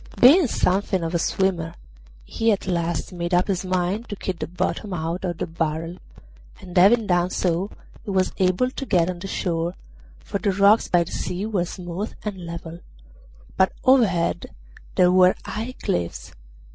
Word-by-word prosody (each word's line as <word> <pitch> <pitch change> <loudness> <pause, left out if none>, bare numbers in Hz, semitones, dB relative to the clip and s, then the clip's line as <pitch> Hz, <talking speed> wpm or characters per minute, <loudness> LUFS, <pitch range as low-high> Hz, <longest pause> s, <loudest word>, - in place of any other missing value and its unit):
Being 295 +6 +7
something 190 -3 0
of 165 +1 -3
a 170 - +1
swimmer, 175 -3 0 0.5
he 225 - 0
at 200 - -1
last 170 -2 -2
made 175 0 -1
up 180 - +2
his 195 -3 -1
mind 185 +4 -1
to 205 - -4
kick 190 -3 -4
the - - -3
bottom 180 +3 -3
out 165 +2 -3
of 175 -3 -2
the - - -2
barrel, 165 +1 -3 0.6
and 180 0 -11
having 210 +5 +5
done 175 -2 +2
so 185 +1 0 0.3
he 220 - -8
was 190 -1 +1
able 185 +7 +2
to 270 - -5
get 180 -2 +2
on 175 - -8
shore, 175 -3 -2 0.4
for 200 - -4
the 200 -2 0
rocks 200 +3 +5
by 175 -1 +3
the 170 - -10
sea 180 +3 -3
were 200 -5 0
smooth 180 +3 -5
and 195 -4 -4
level; 170 0 -7 0.8
but 190 0 +3
overhead 195 -10 +3 0.5
there 180 -1 +5
were 185 0 +5
high 230 +5 -5
cliffs. 85 -1 -2
185 Hz, 170 wpm, -23 LUFS, 170-200 Hz, 0.8 s, Being